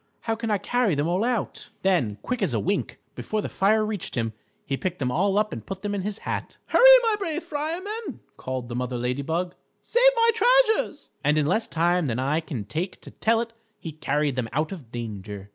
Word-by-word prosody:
How 225 - -1
can 225 0 -3
I 210 - +3
carry 240 -2 +1
them 145 +2 0
all 180 +5 +1
out?" 240 -3 -2
Then, 165 - +2
quick 250 -2 -2
as 155 - +1
a - - +1
wink, 100 - -1
before 215 - -3
the - - -2
fire 215 +2 +3
reached 210 -4 -4
him, 115 -2 -1 0.3
he 140 - -1
picked 180 +5 -3
them 125 -5 -1
all 195 +7 +2
up 215 0 +1
and - - -6
put 190 0 -7
them 205 0 -2
in 200 - -1
his 205 +2 -2
hat. - - -4
"Hurry, - - +4 0.2
my 445 -2 +2
brave 335 -3 -2
fireman!" 340 - -4 0.2
called 130 -2 -4
the 120 - -5
Mother 125 0 -2
Lady 125 +3 -1
Bug; 170 +5 -2 0.3
"save 485 - 0
my 460 0 +5
treasures." 465 -9 +3
And 150 +1 +3
in 150 - +3
less 215 +9 +1
time 170 0 +1
than 115 -2 -1
I 140 +5 +1
can 135 -10 -5
take 170 - -4
to - - -11
tell 225 +1 +2
it, 230 -1 -6 0.3
he 160 - -6
carried 150 -2 -1
them 120 -3 -1
out 155 +3 0
of 150 - -9
danger. 105 -4 -6
180 Hz, 220 wpm, -25 LUFS, 135-225 Hz, 0.3 s, my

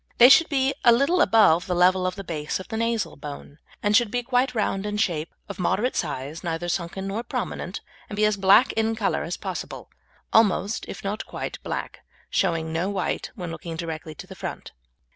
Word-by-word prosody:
They 245 +1 +9
should 330 +4 +7
be 270 -2 +1
a 235 - +7
little 280 +9 +3
above 180 -7 +5
the 180 - 0
level 185 +1 +4
of 185 - -3
the 195 - -7
base 155 -3 -3
of 185 - -10
the 220 - -4
nasal 230 -1 -1
bone, 145 +1 -9 0.2
and 205 0 +3
should 235 0 +4
be 245 +2 -1
quite 250 0 +1
round 195 -3 0
in 210 0 -3
shape, 170 -7 -1 0.2
of 200 -2 -8
moderate 230 +7 0
size, 150 0 -3
neither 170 0 -3
sunken 175 +2 -3
nor 200 +4 -2
prominent, - - -4 0.3
and 205 - -5
be 210 +1 +3
as 210 -1 +2
black 195 +5 +5
in 225 0 0
colour 220 - 0
as - - -4
possible - - -6 0.4
almost, 210 -1 +3
if - - -8
not 200 +2 -3
quite, - - -6
black, - - -5 0.3
showing 165 -3 0
no 170 +4 0
white 190 -5 -2
when 180 -6 -5
looking 165 0 -6
directly 160 -1 -6
to - - -9
the - - -10
front. - - -7
195 Hz, 200 wpm, -25 LUFS, 170-225 Hz, 0.4 s, They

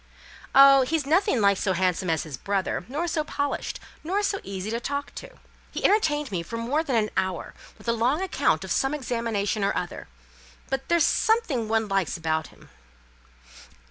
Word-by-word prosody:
"Oh! 275 0 +9
he's 295 +3 0
nothing 310 - +2
like 200 -1 +4
so 190 -1 0
handsome 180 0 0
as 160 -1 +1
his 155 -4 -7
brother; 195 +3 -2
nor 300 +7 -2
so 315 -2 0
polished; 285 -1 -3 0.2
nor 385 +6 0
so 395 -1 0
easy 195 +2 -5
to 230 - -1
talk 280 +3 -4
to. - - -10 0.3
He - - -4
entertained 300 - +2
me 180 -3 -1
for 230 +8 -6
more 260 +8 0
than 270 -6 -1
an 215 -2 +1
hour 185 -2 -2 0.2
with - - -16
a 235 - +3
long 245 +7 +1
account 380 0 +1
of - - -6
some 270 +2 +1
examination 230 -6 -1
or 200 - +1
other; 175 - -5 0.6
but 270 0 -3
there's 340 -3 +4
something 440 - +1
one 220 -1 +1
likes 195 -3 0
about 160 -1 -1
him." - - -19
235 Hz, 180 wpm, -25 LUFS, 195-300 Hz, 0.6 s, Oh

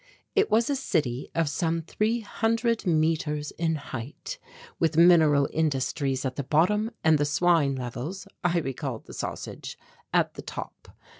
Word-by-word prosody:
It 410 0 +3
was 230 +1 +3
a 285 - +1
city 145 - -1
of 165 -2 +2
some 165 +3 -1
three 220 +7 0
hundred 225 0 0
metres 155 -2 +1
in 160 -1 -1
height 140 - -7 0.4
with 160 -1 +1
mineral 160 -5 +6
industries 140 -3 0
at 130 -1 -3
the 140 - -1
bottom 195 - +2
and 160 -2 +5
the - - +3
swine 150 -1 +3
levels 130 - -5 0.2
I 175 0 +2
recalled 135 -3 -4
the - - -11
sausage - - -6 0.3
at - - +2
the - - -8
top. - - -8
160 Hz, 150 wpm, -27 LUFS, 140-180 Hz, 0.4 s, mineral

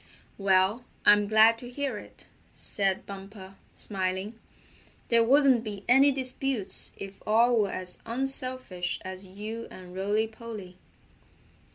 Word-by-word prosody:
"Well, 195 +4 +3 0.2
I'm 205 0 +6
glad 220 +2 +5
to 245 - -9
hear 280 +2 -3
it," - - -15 0.3
said 195 -2 -1
Bumper, 195 -1 -10 0.2
smiling. 190 +2 -3 0.7
"There 230 -1 +5
wouldn't 265 -1 +4
be 205 -3 -6
any 270 +3 +6
disputes 260 -4 -1
if 195 0 -9
all 235 +3 +4
were 205 -2 +2
as 180 -1 -6
unselfish 255 -6 -2
as 185 +1 -7
you 215 +4 -7
and 180 -1 -11
Rolly 205 +3 +1
Polly." 220 -5 -9
215 Hz, 125 wpm, -28 LUFS, 190-240 Hz, 0.7 s, I'm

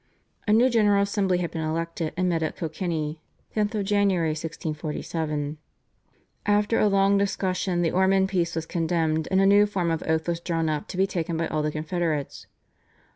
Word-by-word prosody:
A - - +3
new 230 +4 +5
General 205 -5 +3
Assembly 200 -3 +1
had 175 -2 -2
been 165 - -4
elected 165 +1 -2
and 185 0 +1
met 170 -2 0
at 155 - -2
Kilkenny 160 -2 -3 0.3
(10 210 -1 +1 0.2
Jan. 205 0 +3
1647). 155 -2 -3 0.9
After 210 +2 +2
a 215 - +4
long 195 0 +3
discussion 185 -2 0
the 165 - +1
Ormond 190 +1 +3
Peace 170 -3 0
was 165 -1 -2
condemned, 160 -2 0
and 190 - +3
a 195 - +4
new 205 +1 +6
form 180 -5 -1
of 165 - -1
oath 160 +1 0
was 170 -1 -1
drawn 165 -2 -1
up 150 -1 -2
to 185 - -7
be 190 - +4
taken 170 -3 -3
by 165 - 0
all 155 - -1
the 150 - 0
Confederates. 155 -1 -3
170 Hz, 180 wpm, -25 LUFS, 160-195 Hz, 0.9 s, new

